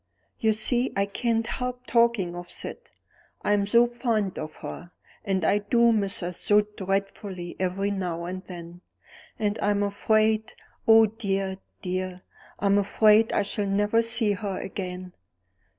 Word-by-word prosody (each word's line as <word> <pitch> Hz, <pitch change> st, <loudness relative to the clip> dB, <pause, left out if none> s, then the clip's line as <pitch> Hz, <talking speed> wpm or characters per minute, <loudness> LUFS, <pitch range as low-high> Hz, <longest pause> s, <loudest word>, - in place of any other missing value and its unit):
"You 220 Hz, -2 st, +3 dB
see, 240 Hz, +4 st, +2 dB
I 195 Hz, 0 st, +2 dB
can't 225 Hz, +2 st, -1 dB
help 250 Hz, +1 st, -4 dB
talking 235 Hz, -8 st, +2 dB
of 175 Hz, 0 st, -8 dB
Syd, -, -, -6 dB, 0.6 s
I'm 205 Hz, -1 st, +2 dB
so 235 Hz, +3 st, +5 dB
fond 235 Hz, -5 st, -1 dB
of 155 Hz, -, -6 dB
her; 175 Hz, -, -7 dB, 0.3 s
and 190 Hz, -5 st, 0 dB
I 205 Hz, -, +3 dB
do 235 Hz, +3 st, +3 dB
miss 200 Hz, -3 st, 0 dB
her 175 Hz, 0 st, -3 dB
so 205 Hz, +4 st, +3 dB
dreadfully 195 Hz, -3 st, -4 dB
every 190 Hz, +2 st, -1 dB
now 180 Hz, -4 st, -3 dB
and 185 Hz, +1 st, -5 dB
then; 175 Hz, -1 st, -10 dB, 0.6 s
and 210 Hz, -1 st, -1 dB
I'm 205 Hz, 0 st, +1 dB
afraid 215 Hz, +2 st, +1 dB, 0.3 s
oh, 225 Hz, 0 st, +8 dB
dear, 195 Hz, -3 st, -2 dB, 0.2 s
dear, 185 Hz, 0 st, -3 dB, 0.3 s
I'm 200 Hz, 0 st, +3 dB
afraid 215 Hz, +2 st, +4 dB
I -, -, +2 dB
shall 205 Hz, 0 st, -1 dB
never 205 Hz, +3 st, +2 dB
see 230 Hz, -2 st, +2 dB
her 195 Hz, -1 st, -3 dB
again!" 180 Hz, -1 st, -6 dB
205 Hz, 145 wpm, -26 LUFS, 185-220 Hz, 0.6 s, oh